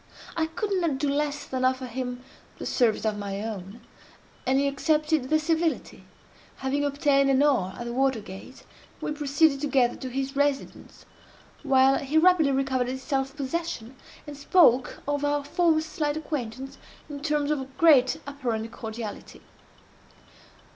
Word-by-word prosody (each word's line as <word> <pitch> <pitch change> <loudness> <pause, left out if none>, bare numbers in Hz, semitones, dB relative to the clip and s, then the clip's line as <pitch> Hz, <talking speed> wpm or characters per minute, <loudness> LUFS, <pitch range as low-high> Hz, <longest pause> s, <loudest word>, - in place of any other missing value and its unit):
I 320 -1 0
could 400 +6 -4
not 315 -6 0
do 285 +1 0
less 290 0 -1
than 260 -1 -3
offer 255 0 +1
him 250 0 -5 0.3
the - - -7
service 230 -4 +1
of 215 -1 -1
my 200 -1 -4
own; 210 0 -7 0.7
and 265 +1 +3
he 280 - +2
accepted 300 0 +1
the 310 - +4
civility. 320 +1 -1 0.5
Having 280 +2 -1
obtained 280 -1 +2
an 270 +1 +4
oar 240 -11 +1
at 240 - -6
the 235 - -4
water 265 -1 +1
gate, 200 +5 -11 0.4
we - - -3
proceeded 290 -1 +2
together 270 -5 +2
to 260 - -6
his 270 +2 -3
residence, 285 -1 -2 0.6
while 270 -2 +4
he 280 +3 -1
rapidly 325 -3 +5
recovered 265 -2 0
his 260 +1 -5
self 270 -1 -2
possession, 275 -4 -4 0.3
and 295 - -8
spoke 280 -4 +3
of 290 0 -1
our 290 0 +1
former 315 +2 +2
slight 310 -1 -2
acquaintance 270 -3 -5 0.3
in 290 -2 -7
terms 300 -1 0
of 270 -3 -4
great 300 -3 +5
apparent 240 -6 -3
cordiality. 220 -2 -7
275 Hz, 150 wpm, -26 LUFS, 255-295 Hz, 0.7 s, rapidly